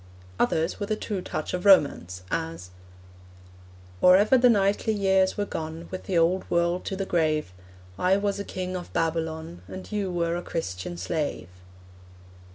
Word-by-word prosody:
Others 160 +1 +1
with 205 - -4
a 215 - +1
true 205 -3 -4
touch 155 - -4
of 180 0 -2
romance, 140 - +4
as 80 +3 -3 1.3
Or 180 0 +8
ever 210 +6 +4
the 250 -1 +6
knightly 205 0 +2
years 190 -2 +2
were 205 - 0
gone 160 -1 -6
With 185 - -6
the 185 - 0
old 175 +3 +2
world 170 +1 +1
to 195 - -3
the 195 0 -3
grave, 155 - 0 0.5
I 185 +2 +3
was 200 0 -1
a - - -2
king 185 -1 -5
in 180 - -3
Babylon, 160 - -2
And 185 +3 -9
you 205 -2 -1
were 170 -1 0
a 175 - -3
Christian 95 - -4
slave. 95 - -3
175 Hz, 165 wpm, -26 LUFS, 160-195 Hz, 1.3 s, Or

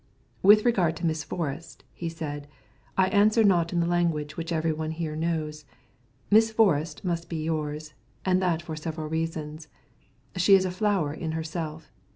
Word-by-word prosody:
"With 210 +3 +7
regard 185 -9 +2
to 165 - -4
Miss 160 -1 0
Forrest," 165 -1 -5
he 170 - -4
said, 145 -3 -6 0.5
"I 190 - +5
answer 215 +2 +4
not 175 -5 +3
in 175 -1 +1
the - - +1
language 165 -4 0
which 165 +1 -5
every 160 -1 +1
one 155 0 -3
here 160 -1 -4
knows. 155 -2 -2 0.7
Miss 220 +2 +6
Forrest 170 -8 +1
must 170 -1 -2
be 160 -2 -3
yours, 155 -1 -3 0.3
and 185 0 +3
that 170 -2 0
for 160 -2 -5
several 155 0 -5
reasons. 160 -1 -4 0.7
She 185 +2 +6
is 190 -1 +3
a 185 - -1
flower 185 -6 0
in 160 0 -4
herself. 160 -1 -5
165 Hz, 170 wpm, -27 LUFS, 155-180 Hz, 0.7 s, With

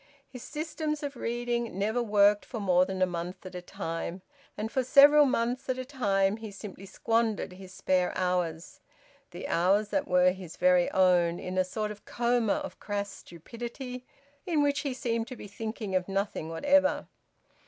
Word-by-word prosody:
His 250 -2 -10
systems 305 0 -4
of 285 -1 -4
reading 240 -3 -2
never 220 +5 0
worked 205 -2 +4
for 235 - -6
more 185 -3 +3
than 190 -1 -1
a - - +6
month 175 +1 -6
at 185 - -8
a 180 - -6
time. 175 -1 -5 0.3
And 215 +2 -3
for 260 - +1
several 290 +3 +7
months 250 +1 -1
at 255 - 0
a 255 - -4
time 205 -7 +1
he 220 -1 -7
simply 195 -1 -9
squandered 225 -3 0
his 185 0 -12
spare 185 -1 +1
hours, 180 -2 -2 0.5
the - - -7
hours 195 +5 +2
that 290 +3 -1
were 180 0 +4
his 185 -3 -9
very 180 -1 +4
own, 175 -2 +3
in 185 0 -5
a 185 - +3
sort 210 +3 -3
of 210 - -11
coma 240 -3 +1
of - - -5
crass 205 -1 -3
stupidity, 240 - -8 0.4
in 315 -4 +2
which 285 0 +1
he 275 -4 -3
seemed 230 -2 -2
to 255 - -7
be - - -10
thinking 215 0 -5
of 185 0 0
nothing 195 -4 -2
whatever. 285 - +2
210 Hz, 175 wpm, -29 LUFS, 185-245 Hz, 0.5 s, several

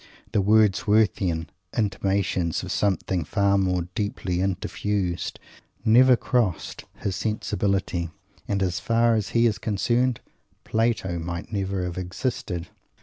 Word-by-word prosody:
The 105 - +2
Wordsworthian 105 -4 +3 0.3
intimations 95 -5 0
of - - -5
"something 95 -3 0
far 100 +5 +2
more 90 -2 +1
deeply 100 -5 -2
interfused" 95 -1 -2 0.5
never 125 +3 +7
crossed 115 -8 -1
his 95 -2 -3
sensibility; 100 -5 -1 0.4
and, 100 -1 0
as 90 -1 -1
far 115 0 +3
as 105 -3 0
he 115 - +5
is 110 -2 +1
concerned, 120 +3 +1 0.4
Plato 110 -6 0
might 85 +5 -5
never 95 -2 -1
have 90 0 -3
existed. 90 -2 -3
100 Hz, 115 wpm, -25 LUFS, 90-110 Hz, 0.5 s, never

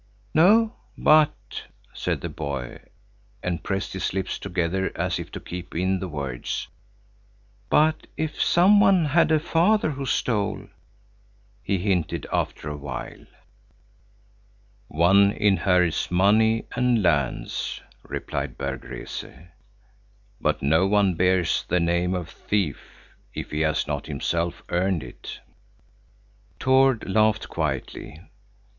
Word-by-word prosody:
"No; 215 +8 +5 0.2
but," 155 -1 +3 0.3
said - - -2
the - - -4
boy, 65 -4 -5 0.6
and 90 -2 -2
pressed 95 0 -3
his 95 - -2
lips 95 -1 -2
together 95 0 -1
as - - -1
if - - -7
to - - -5
keep 90 0 -8
in 95 +2 +1
the 95 - -4
words, 70 -7 -4 1.0
"but 155 +1 +2
if 155 -1 -3
some 190 +4 +5
one 190 -4 +5
had 155 +2 +3
a 155 - +4
father 170 +3 +2
who 135 -1 -5
stole," 105 -5 -1 1.0
he 100 - 0
hinted 90 -3 -1
after - - -2
a 75 -1 -4
while. 70 -2 -7 1.6
"One 100 +5 +4
inherits 95 -5 +2
money 110 +5 +3
and 125 -4 +2
lands," 70 -8 -1 0.2
replied - - -5
Berg 70 -1 -4
Rese, - - -6 1.1
"but - - 0
no 80 +7 +3
one 100 -2 +3
bears 90 0 +2
the 90 - +2
name 85 +2 +1
of 90 -3 -4
thief 95 -4 -2 0.6
if - - -6
he 75 - -2
has 80 -1 +1
not - - -4
himself 85 0 -2
earned 90 -1 0
it." - - -10 1.2
Tord 130 -2 +3
laughed 110 +2 +2
quietly. 75 -1 -4
95 Hz, 120 wpm, -24 LUFS, 85-125 Hz, 1.6 s, No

